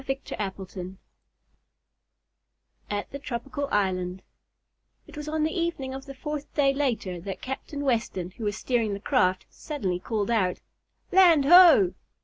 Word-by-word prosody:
Chapter 200 -2 -3
Fifteen 190 -1 -8 1.9
At 205 0 -3
the 280 - -6
Tropical 275 +2 -4
Island 185 -2 -1 0.8
It - - -14
was 300 0 -6
on 310 0 0
the 315 - +1
evening 335 -7 -2
of 270 +1 -8
the 275 - -8
fourth 300 +1 -5
day 275 -2 +3
later 230 -10 -1
that 195 +1 -7
Captain 265 +2 -5
Weston, 225 -9 -1
who 220 +3 -7
was 205 0 -1
steering 230 -5 0
the - - -7
craft, 185 -1 +1
suddenly 200 - -3
called 215 +2 -2
out: 190 -6 +1 0.5
"Land 345 -6 +6
ho!" 355 +3 +8
245 Hz, 140 wpm, -26 LUFS, 195-290 Hz, 1.9 s, ho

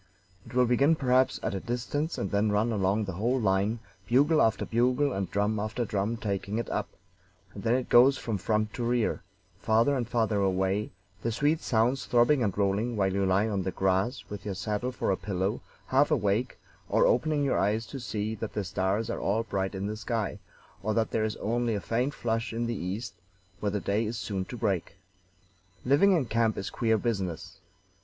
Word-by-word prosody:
It - - -11
will 125 0 +5
begin 140 +6 +3
perhaps 130 -2 +2
at - - -1
a 95 - -2
distance 125 - -3
and 100 - -3
then 105 +1 +2
run 105 +3 +1
along 100 0 +1
the 95 - -4
whole 115 +9 0
line, 100 +1 +1 0.3
bugle 145 +6 +4
after 110 -1 +2
bugle 125 +4 +1
and 95 -1 -2
drum 105 +1 0
after 110 +3 -2
drum 105 +2 -1
taking 100 -1 -3
it 115 - -2
up, - - -2 0.6
and - - -8
then 115 +1 +2
it 130 -1 -1
goes 130 +3 +6
from 110 -4 -3
front 110 +2 0
to 120 - -4
rear, 120 -1 0 0.4
farther 115 +6 +3
and 120 -3 -2
farther 110 -3 +1
away, 95 +1 0 0.3
the 115 - -1
sweet 150 +7 +1
sounds 120 +3 +1
throbbing 125 +3 +4
and 100 -5 0
rolling 105 +4 +1
while 95 -2 +1
you 100 0 +1
lie 95 +4 +2
on 100 -3 -1
the 95 - -2
grass 95 +6 0
with 105 -1 -7
your 100 -2 -4
saddle 105 +6 -2
for 125 - -1
a - - +2
pillow, 100 +2 -2 0.2
half 135 +3 +3
awake, 115 -4 0 0.3
or - - +4
opening 150 +3 +2
your 140 - +1
eyes 105 +3 +1
to 135 - -7
see 110 -3 -3
that 110 0 -5
the 105 - -2
stars 95 +4 -1
are - - -3
all 110 +4 0
bright 95 -3 -2
in 95 +1 -3
the 105 +1 -3
sky, 110 -2 -3 0.4
or 110 +2 -1
that 115 -1 +1
there 110 - +1
is 110 - -2
only 115 +1 -1
a - - -1
faint 125 +8 -1
flush 115 0 -2
in 115 +1 -1
the 120 - -1
east, 100 +3 -4 0.5
where 105 - 0
the 105 +1 -1
day 105 +3 0
is 115 +1 -4
soon 100 -3 -3
to 125 - -8
break. 95 -5 -1 0.9
"Living 145 +10 +5
in 160 -7 +2
camp 115 -2 +1
is 95 - -4
queer 110 -1 +1
business. 95 -7 -3
110 Hz, 205 wpm, -28 LUFS, 100-120 Hz, 0.9 s, goes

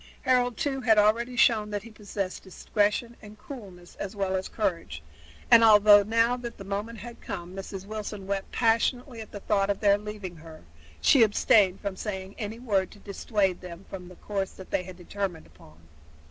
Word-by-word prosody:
Harold, 250 -2 +2
too, 275 -4 -1
had 225 -3 +4
already 230 +4 +3
shown 220 -3 +4
that 205 -1 -4
he 230 - -12
possessed 200 -3 -5
discretion 210 +4 -1
and 210 0 -12
coolness 195 -10 -11
as 200 +1 -5
well 195 -1 -1
as 190 0 -3
courage, 170 - -3 0.5
and 230 - +9
although 210 -1 +8
now 230 +3 +2
that 240 -1 -7
the - - -9
moment 205 +4 -4
had 235 +3 -10
come 180 -1 -6
Mrs. 195 0 -7
Wilson 210 -1 -6
wept 195 0 -3
passionately 235 +1 +1
at 220 - -10
the 205 - -8
thought 200 -1 +1
of 200 - 0
their 200 -1 +4
leaving 205 -4 -7
her, 160 0 -13 0.4
she 270 - +5
abstained 205 -3 +4
from 200 -2 -3
saying 190 -1 -5
any 215 0 -4
word 205 -6 0
to - - -15
dissuade 200 -2 -1
them 180 0 -10
from 180 -2 -7
the 180 - -12
course 195 -1 -4
they 190 -1 -3
had 180 0 -10
determined 185 -1 -4
upon. 75 0 -19
205 Hz, 185 wpm, -27 LUFS, 190-225 Hz, 0.5 s, and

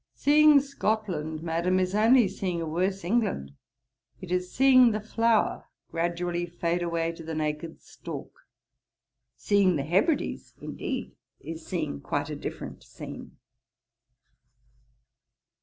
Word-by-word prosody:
'Seeing 300 0 +6
Scotland, 205 - -2
Madam, 170 +3 +1
is 185 0 0
only 225 +2 +5
seeing 180 -2 -3
a 165 - -2
worse 185 +4 -1
England. 175 - 0 0.7
It 185 -2 -9
is 180 0 -1
seeing 255 -2 +6
the 215 - -1
flower 225 +1 +1 0.3
gradually 175 +1 -1
fade 170 0 -1
away 170 -1 -1
to 165 0 -11
the 160 0 -5
naked 155 +1 -3
stalk. - - -9 0.9
Seeing 200 -3 +3
the 140 - -1
Hebrides, 195 - 0
indeed, - - -5 0.3
is 160 0 -8
seeing 70 - -3
quite - - -2
a - - -3
different - - -7
scene.' - - -10
180 Hz, 120 wpm, -27 LUFS, 165-220 Hz, 0.9 s, Seeing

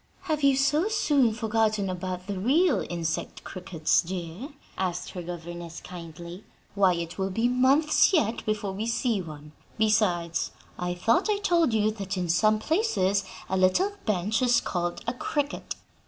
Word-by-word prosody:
"Have 310 -5 -2
you 275 -1 +5
so 295 +7 +2
soon 285 - +2
forgotten 220 -2 0
about 185 0 -4
the 200 -1 -4
real 290 - +3
insect 165 -2 -3
crickets, 175 -4 0
dear?" 180 - -6 0.3
asked 180 -2 -3
her 180 - -6
governess, 175 0 -7
kindly. 170 +1 -9 0.3
"Why, 190 -3 +3
it 170 +2 -5
will 190 0 0
be 225 +5 +1
months 265 +8 +4
yet 235 - +1
before 210 -2 -2
we 210 +4 -4
see 225 -2 0
one. 150 -3 -10 0.3
Besides, 185 -6 +1 0.3
I 180 0 -2
thought 225 - +2
I 420 - +2
told 345 -8 +2
you 215 -1 +2
that 195 -2 -5
in 180 -2 -2
some 215 +6 +3
places 215 - +1 0.2
a 190 - -1
little 190 - +3 0.2
bench 210 +3 +1
is 245 -2 +4
called 175 -1 -3
a 235 - -1
'cricket'? 285 +3 -3
205 Hz, 155 wpm, -27 LUFS, 180-250 Hz, 0.3 s, you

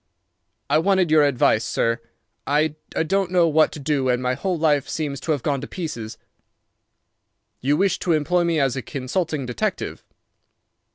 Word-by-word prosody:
"I 155 - +3
wanted 185 -1 +2
your 155 -1 +6
advice, 125 -5 +3
sir. 115 0 0 0.5
I 150 +2 +2 0.4
don't 195 +1 0
know 175 -2 +3
what 155 0 +3
to - - -7
do 140 -2 0
and 125 -1 +2
my 125 0 0
whole 175 +7 -2
life 150 -3 +1
seems 145 -4 -3
to 160 - -3
have 145 -5 -1
gone 140 -3 0
to 140 - -6
pieces." 150 - -6 1.4
"You 145 +3 +1
wish 195 +1 +1
to 175 - +1
employ 175 +3 +2
me 170 -2 +1
as 135 -3 +1
a 130 - -3
consulting 145 +3 -3
detective?" 125 -2 -3
150 Hz, 165 wpm, -22 LUFS, 135-170 Hz, 1.4 s, your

